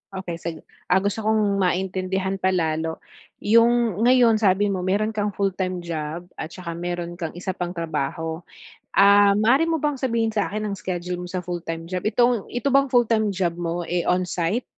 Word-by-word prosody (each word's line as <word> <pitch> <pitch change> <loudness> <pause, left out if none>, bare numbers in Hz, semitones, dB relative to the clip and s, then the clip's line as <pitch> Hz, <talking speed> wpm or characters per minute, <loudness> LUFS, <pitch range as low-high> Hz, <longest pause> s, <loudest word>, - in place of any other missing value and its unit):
Okey, 175 -3 -5
sige. 165 -1 -6 0.3
Ah, 190 +2 +3
gusto 205 +2 -1
kong 210 -2 +1
maintindihan 190 +1 -1
pa 190 - +1
lalo 160 -1 -1 0.5
yung 230 -1 +3
ngayon 240 -3 +5
sabi 200 0 +3
mo 195 -2 -1
meron 205 +4 0
kang 210 -1 -1
full-time 190 -2 -2
job 165 +1 -4
at 155 - -6
saka 170 -1 -7
meron 175 0 -4
kang 165 -1 -4
isa 190 +1 -3
pang 175 -2 -4
trabaho. 160 0 -3 0.5
Ah, 200 0 +6
maaari 250 +9 +4
mo 330 -1 0
bang 295 0 0
sabihin 230 -4 -1
sa 200 -5 0
akin 215 +1 -3
ang 200 - -2
schedule 180 -1 -4
mo - - -5
sa 185 - -2
full-time 165 -2 -5
job, 180 -1 -3
itong 240 0 +2
ito 245 +3 -1
bang 275 0 +3
full-time 225 -3 +3
job 180 -3 -1
mo 170 0 -3
eh, 175 0 0
on 180 0 +1
site? 180 +8 -1
190 Hz, 185 wpm, -23 LUFS, 175-215 Hz, 0.5 s, Ah